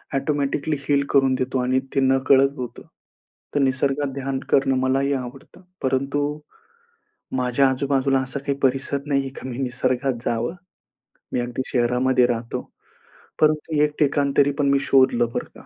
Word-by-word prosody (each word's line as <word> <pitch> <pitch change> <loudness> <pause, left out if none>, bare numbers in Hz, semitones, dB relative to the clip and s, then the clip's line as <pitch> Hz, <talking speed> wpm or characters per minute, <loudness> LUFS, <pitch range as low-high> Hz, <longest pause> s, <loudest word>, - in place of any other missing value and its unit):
Automatically 145 +1 -1
heal 140 0 +1
करून 135 -1 +3
देतो 130 0 -1
आणि 130 +1 +1 0.2
ते - - +3
नकळत 135 +1 +4
होतं. 125 -2 -6 0.7
तर 145 - +3
निसर्गात 135 +1 0
ध्यान 135 -1 -3
करणं 135 -1 +3
मलाही 135 +2 +1
आवडतं. 130 +6 -7 0.2
परंतु 140 +3 -1 1.0
माझ्या 125 +2 +2
आजूबाजूला 135 0 +1
असा 130 +1 -3
काही 140 0 -3
परिसर 135 +1 +1
नाहीये 140 -2 0
का 130 - -7
मी 120 - -6
निसर्गात 130 0 0
जावं. 120 +8 -1 0.8
मी 125 - +1
अगदी 120 +1 -3
शहरामध्ये 125 +1 +2
राहतो. 115 -1 -3 0.8
परंतु 155 0 +2
एक 150 0 0
ठिकाण 140 -1 +2
तरी 145 0 +5
पण 140 - +2
मी 140 - +3
शोधलं, 130 -3 +3
बरं - - -4
का? - - -14
135 Hz, 145 wpm, -22 LUFS, 130-140 Hz, 1.0 s, तरी